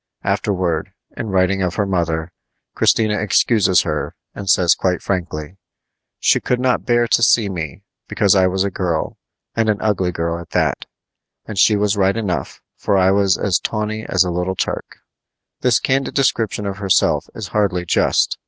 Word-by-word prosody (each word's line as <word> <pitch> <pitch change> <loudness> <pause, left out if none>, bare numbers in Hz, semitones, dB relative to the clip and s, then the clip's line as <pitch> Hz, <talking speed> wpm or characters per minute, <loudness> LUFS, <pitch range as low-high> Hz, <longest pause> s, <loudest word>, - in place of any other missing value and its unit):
Afterward, 90 -5 -1 0.2
in - - -5
writing 95 0 +1
of 90 -2 -1
her 100 - 0
mother, 85 -3 -1 0.4
Christina 110 -2 +2
excuses 105 -2 +3
her, - - -3 0.2
and 100 -2 -6
says 90 0 +5
quite 90 -2 -1
frankly: 85 -2 -4 0.6
She - - +3
could 125 - -1
not 125 -1 0
bear 120 -1 +3
to - - +3
see 115 -3 +4
me, 85 +1 -6 0.2
because 100 -3 +2
I 95 -1 +4
was 95 +1 0
a 100 - -2
girl, 85 -4 -2 0.4
and 115 -1 +1
an 105 - +1
ugly 95 -4 0
girl 85 0 -3
at 85 - -11
that. - - 0 0.6
And 105 -3 -5
she 110 - +5
was 105 0 0
right 95 +1 +2
enough, 100 -6 -3
for 100 - 0
I 95 0 +4
was 100 -3 +2
as 95 -4 +1
tawny 110 0 -3
as - - +2
a 90 - -3
little 90 +2 -2
Turk. - - -4 0.6
This 125 -3 +3
candid 135 0 -1
description 115 -6 0
of 100 -1 -4
herself 100 -2 +1
is 105 -5 -6
hardly 95 -4 0
just. - - +1
95 Hz, 170 wpm, -19 LUFS, 90-105 Hz, 0.6 s, says